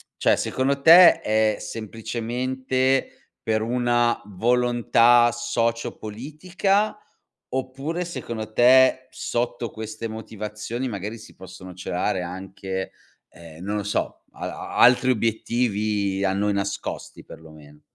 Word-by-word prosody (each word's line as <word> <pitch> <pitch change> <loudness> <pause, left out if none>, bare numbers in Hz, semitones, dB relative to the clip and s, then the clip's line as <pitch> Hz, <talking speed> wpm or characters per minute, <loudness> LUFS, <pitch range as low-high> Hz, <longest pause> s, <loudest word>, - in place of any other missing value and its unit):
Cioè - - +3
secondo 140 +1 -1
te 170 +4 +8
è 110 0 +1
semplicemente 130 +4 -2
per 110 -1 0
una 120 0 +1
volontà 120 +2 +3
socio-politica, 120 - -2 0.5
oppure 135 +7 -3
secondo 110 -10 -6
te 130 +2 +5
sotto 120 0 -3
queste 110 +1 -6
motivazioni 110 +3 -6
magari 105 +1 -5
si 110 - -15
possono 95 0 -11
celare 90 +1 -2
anche, 95 +1 -6 0.4
ehm, 85 0 -13
non 105 +2 -2
lo 105 - -2
so, 105 - -3
al - - -6
a - - -8
altri 125 +1 +5
obiettivi 105 -4 0
a 95 - +1
noi 100 +1 0
nascosti 100 0 -4
per 80 - -12
lo 80 - -14
meno? 75 -1 -16
115 Hz, 115 wpm, -23 LUFS, 100-125 Hz, 0.5 s, te